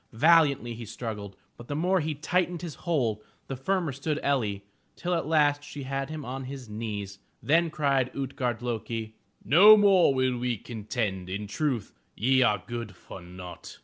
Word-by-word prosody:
Valiantly 145 -2 +4
he 115 +1 -8
struggled, 105 -3 -6 0.2
but 120 - -11
the 145 - -3
more 180 +5 +2
he 155 -1 -2
tightened 175 +3 -1
his 165 -4 -5
hold, 125 - -1 0.2
the 135 - -5
firmer 170 +4 -1
stood 145 +3 -2
El'li, 110 -8 0 0.3
till 180 0 -2
at 165 -4 -1
last 145 -2 +3
she 145 -1 -8
had 135 +1 -3
him 155 -2 -6
on 130 +2 -5
his 135 -2 -8
knees. 105 -2 -5 0.2
Then 165 +3 +3
cried 140 -5 +1
Ut'gard 125 -3 -3
lo'ki: 115 -2 -4 0.3
"No 205 +8 +9
more 195 -6 +5
will 130 -1 +1
we 120 -1 -1
contend. 105 -4 -4
In 100 +3 -4
truth 120 +1 -2 0.2
ye 130 +4 +3
are 105 -6 +2
good 115 -5 -6
for 95 - -11
naught!" 90 0 -10
130 Hz, 170 wpm, -27 LUFS, 110-155 Hz, 0.3 s, No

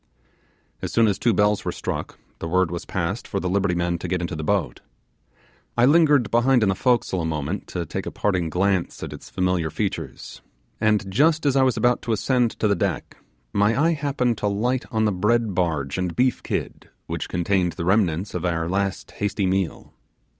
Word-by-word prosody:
As - - -4
soon 115 - +4
as 100 -3 +1
two 120 - +3
bells 105 0 +2
were - - -2
struck, - - -5 0.2
the 80 - -4
word 90 0 +2
was 85 - -5
passed - - -3
for - - -2
the 90 - -2
liberty 95 -1 +1
men 85 0 -1
to 90 - -5
get 90 +1 -1
into 85 -2 -3
the 80 - -4
boat. 100 -1 -1 1.0
I 120 - +5
lingered 145 -5 +4
behind 120 +1 +4
in 100 - +3
the - - +3
forecastle 115 -4 +1
a - - -2
moment 80 +4 -3
to 85 -2 -4
take - - -5
a - - -3
parting 95 -5 0
glance 95 +1 0
at - - -5
its - - -11
familiar 90 -3 0
features, 100 +4 -4 0.4
and 105 -3 +1
just 155 - +3
as 140 -2 +3
I 135 - +4
was 130 -1 +2
about 120 0 +2
to 115 - -1
ascend 120 +3 +2
to 110 - +2
the 100 - +2
deck - - -3 0.4
my 105 +5 +2
eye 165 +3 +3
happened 135 -6 -1
to 105 - 0
light 120 +6 0
on 110 -1 +1
the 105 - +2
bread 105 +3 +1
barge 80 -4 -1
and 90 -2 -2
beef 125 0 +2
kid, - - -4 0.2
which - - -4
contained 90 0 0
the 85 - -4
remnants 95 -1 +1
of - - -3
our 85 -2 0
last 100 +1 -2
hasty 100 -1 -1
meal. 95 -3 -2
100 Hz, 205 wpm, -23 LUFS, 90-120 Hz, 1.0 s, I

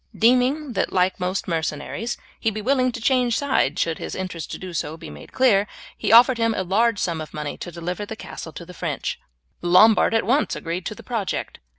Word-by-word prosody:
Deeming 255 +4 +3
that 190 - 0
like 185 +1 +1
most 185 +1 -2
mercenaries 165 +7 -3 0.2
he 225 - +1
would 215 - -8
be 215 - -3
willing 255 0 +2
to - - -6
change 245 -1 +2
sides 260 - +1
should 165 -1 0
his - - -5
interest 185 -3 -5
to - - -5
do 185 -2 -8
so 155 0 -3
be 115 - -9
made 75 - -12
clear, 210 -6 +3 0.3
he - - -1
offered 240 +1 +7
him 230 -1 +2
a 190 - -1
large 215 +5 +2
sum 170 -4 -1
of 155 - -9
money 150 -1 -4
to - - -7
deliver 175 +4 -4
the 215 +2 -6
castle 165 - -8
to 170 - -9
the 180 - -11
French. - - -3 0.4
The 175 - -4
Lombard 215 +5 +6
at 225 - +2
once 265 +7 +2
agreed 170 +2 -4
to 215 - -5
the - - -12
project. 220 -8 -3
200 Hz, 225 wpm, -23 LUFS, 175-235 Hz, 0.4 s, offered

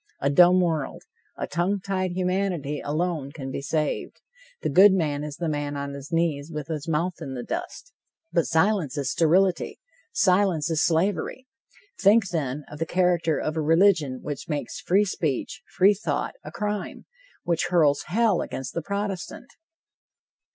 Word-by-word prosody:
A 140 - +1
dumb 180 +4 +6
world, 160 -5 -2 0.3
a - - -2
tongue 185 +4 0
tied 185 -1 -2
humanity 180 -5 -1
alone 155 -2 -2
can 135 -3 -7
be 135 - -4
saved! 150 +1 -2 0.4
The - - 0
good 190 +2 +7
man 150 -6 0
is 150 -1 -5
the 170 - -3
man 145 -1 -2
on 140 0 -4
his 140 +3 -9
knees 165 -2 0
with 150 -1 -6
his 155 -1 -4
mouth 165 +3 -1
in 135 - -5
the 120 - -5
dust. - - -6 0.4
But 170 - +1
silence 160 -5 +1
is 140 -1 -1
sterility! 180 +3 +2 0.3
Silence 180 - +2
is 160 - +2
slavery! 195 +9 0 0.5
Think, 200 0 +4
then, 150 -4 -2
of 150 - -10
the 165 - -1
character 175 -4 +2
of 155 - -2
a 160 - 0
religion 160 -4 +3
which 145 +1 -6
makes 145 -2 -3
free 200 +4 +3
speech, 160 -9 -2 0.2
free 195 +3 +6
thought, 205 - -2
a - - -8
crime 210 -1 -4 0.4
which 170 -2 0
hurls 145 -5 +3
hell 215 0 +2
against 130 -2 -5
the 170 - -2
Protestant! 200 - -4
165 Hz, 160 wpm, -25 LUFS, 145-185 Hz, 0.5 s, good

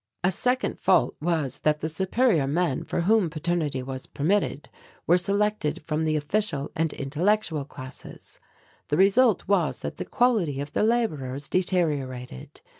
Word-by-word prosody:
"A 180 - +3
second 250 +7 0
fault 180 -3 +3
was 155 -5 -1
that 150 0 +1
the 160 - -1
superior 190 - +1
men 160 -1 0
for - - -2
whom 205 0 +3
paternity 155 -4 -2
was 130 0 -6
permitted 160 -1 -1 0.4
were 175 - +5
selected 200 -4 0
from 155 0 -1
the 155 0 +1
official 150 -1 -1
and 160 -1 0
intellectual 160 +2 0
classes. 130 -2 -11 0.5
The 150 - 0
result 205 +4 +4
was 190 -6 +1
that - - -5
the - - -4
quality 210 - +1
of 145 +1 -5
the - - 0
labourers 150 - 0
deteriorated. 145 - -2
165 Hz, 145 wpm, -26 LUFS, 145-200 Hz, 0.5 s, were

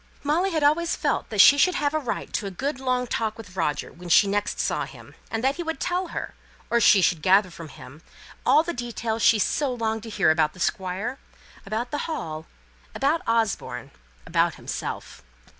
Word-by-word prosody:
Molly 325 +7 +1
had 320 -5 -1
always 330 +4 +2
felt - - -1
that - - -4
she 285 - +8
should 365 +3 +4
have 290 0 0
a 310 - +1
right 260 -6 -4
to 205 - -2
a - - -3
good 265 - -3
long 255 -1 0
talk 220 -2 -2
with 200 -5 -11
Roger 150 -5 -2
when 175 +1 -10
she 170 - +6
next 205 +1 -1
saw - - 0
him; - - -14 0.2
and 225 +1 -3
that 270 +4 +1
he - - -3
would 325 -4 -4
tell 360 +3 -1
her, - - -5 0.4
or 235 0 +3
she 200 -3 +6
should 165 -2 +2
gather 190 +2 +4
from 165 -1 -9
him 145 +1 -13 0.4
all 310 - +5
the 345 +1 -3
details 235 -2 -3
she 225 - +5
so 270 +7 0
longed 225 -2 -2
to 225 - -9
hear 200 -7 +3
about 155 -1 +1
the 185 - -15
Squire 190 +9 -2 0.5
about 225 +5 -3
the 295 +3 -3
Hall 160 - -5 0.5
about 300 +4 +1
Osborne 230 -2 -1 0.3
about - - +1
himself. 65 - -6
230 Hz, 200 wpm, -25 LUFS, 190-285 Hz, 0.5 s, she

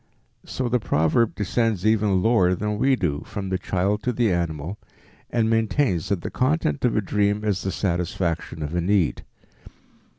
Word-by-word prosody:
So 130 - -2
the 125 +1 +1
proverb 95 +4 +1
descends 105 -1 0
even 105 -4 +2
lower 95 -6 +3
than 105 +2 -2
we 135 +2 +3
do, 75 - -1
from 95 -2 -5
the 95 -1 -1
child 100 +4 0
to 125 - 0
the 115 -3 +1
animal, 85 +2 -3 0.5
and 115 -2 +1
maintains 115 - +1
that 100 -4 0
the - - -5
content 130 - 0
of 125 -3 +2
a - - +3
dream 105 +1 0
is 100 -3 0
the 95 - -2
satisfaction 85 -3 -2
of 75 +2 -5
a 85 - 0
need. 95 -1 +1
100 Hz, 170 wpm, -24 LUFS, 90-115 Hz, 0.5 s, lower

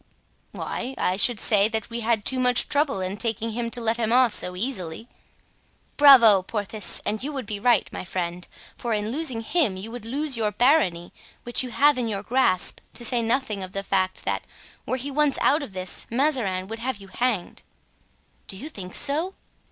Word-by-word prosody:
"Why, 255 +3 -5
I 180 - 0
should 210 +3 +3
say 205 -2 +3
that 220 0 -4
we 235 - -3
had 225 -2 0
too 260 - +2
much 250 -1 +6
trouble 285 -8 +2
in 185 +2 -4
taking 225 0 -2
him 235 +1 -3
to 240 - -1
let 230 0 0
him 225 -1 -1
off 250 -2 +4
so 180 - -1
easily." 190 -2 -4 0.9
"Bravo, 240 -9 +8
Porthos! 205 +1 -3
and 215 +3 -2
you 295 - -3
would 270 -5 -5
be 205 0 -4
right, 240 +3 +3
my - - -5
friend; 175 -1 -4 0.3
for 235 -2 -2
in 210 +1 -2
losing 260 -5 -2
him 230 - 0
you 210 +4 -7
would 245 -2 -8
lose 280 +4 -2
your 215 -2 0
barony, 210 - +2 0.3
which 240 - +1
you 255 - -3
have 285 +2 +3
in 240 - -1
your 200 -2 -4
grasp, 230 -6 +1 0.2
to 240 - -1
say 240 0 +2
nothing 225 -3 -1
of 185 0 -7
the 195 - -3
fact 185 -1 -1
that, - - -1 0.5
were 255 - -1
he 275 +3 -5
once 295 -1 +2
out 295 +3 +3
of 275 -9 -8
this, 185 -2 -5
Mazarin 235 -8 0
would 225 +2 -7
have 255 0 -3
you 195 -1 -13
hanged." 230 -4 -2 0.9
"Do 190 - -6
you 290 +9 -7
think 185 - -8
so?" 325 +7 0
230 Hz, 200 wpm, -24 LUFS, 195-255 Hz, 0.9 s, Bravo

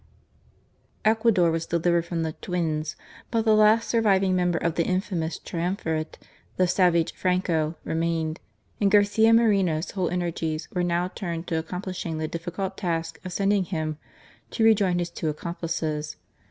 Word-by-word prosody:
Ecuador 220 -6 +4
was 165 0 -2
delivered 170 0 +1
from 170 -1 -2
the 160 -1 -2
" - - -33
twins," 160 -4 -2 0.3
but 230 -1 0
the 220 - +5
last 215 +2 +5
surviving 195 -5 +3
member 175 -1 +1
of 170 0 0
the 170 - +1
infamous 180 -3 -1
triumvirate, 165 -2 -3 0.4
the 185 - +4
savage 175 -2 +2
Franco, 175 -4 0
remained, 165 0 -1 0.4
and 200 - +3
Garcia 205 +2 +4
Moreno's 195 -8 +3
whole 185 -3 -1
energies 165 -3 -2
were 180 - -1
now 175 0 +1
turned 170 -3 -5
to 165 -3 -1
accomplishing 180 0 -5
the 155 0 -2
difficult 180 +4 -4
task 165 -3 -2
of 185 - -6
sending 200 +1 +1
him 155 -4 -3 0.5
to 225 - -1
rejoin 200 -5 +4
his 175 -1 -2
two 160 - -2
accomplices. 155 -1 -3
175 Hz, 150 wpm, -25 LUFS, 165-195 Hz, 0.5 s, the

